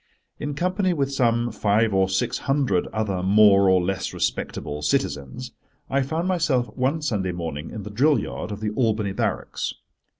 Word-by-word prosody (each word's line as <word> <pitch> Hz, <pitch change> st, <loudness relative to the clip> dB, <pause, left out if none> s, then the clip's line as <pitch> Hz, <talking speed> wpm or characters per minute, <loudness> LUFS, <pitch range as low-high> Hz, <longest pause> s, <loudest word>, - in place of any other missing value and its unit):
In 145 Hz, -1 st, -4 dB
company 185 Hz, +3 st, +1 dB
with 140 Hz, -3 st, -1 dB
some 120 Hz, -2 st, +1 dB
five 105 Hz, +1 st, +1 dB
or 95 Hz, 0 st, +3 dB
six 95 Hz, -, 0 dB
hundred 135 Hz, -10 st, +2 dB
other 105 Hz, -4 st, -2 dB
more 100 Hz, 0 st, +5 dB
or 95 Hz, 0 st, +5 dB
less 95 Hz, +1 st, -2 dB
respectable 75 Hz, 0 st, -3 dB
citizens, 70 Hz, -2 st, -2 dB, 0.4 s
I 135 Hz, +1 st, +2 dB
found 160 Hz, +6 st, -2 dB
myself 160 Hz, -9 st, 0 dB
one 135 Hz, +5 st, 0 dB
Sunday 100 Hz, -10 st, -1 dB
morning 80 Hz, -3 st, -5 dB
in 110 Hz, -, -7 dB
the 105 Hz, -, -7 dB
drill 140 Hz, +8 st, +3 dB
yard -, -, -5 dB
of 105 Hz, 0 st, -6 dB
the 105 Hz, -1 st, -1 dB
Albany 110 Hz, -4 st, 0 dB
Barracks. -, -, -2 dB
110 Hz, 165 wpm, -24 LUFS, 95-135 Hz, 0.4 s, more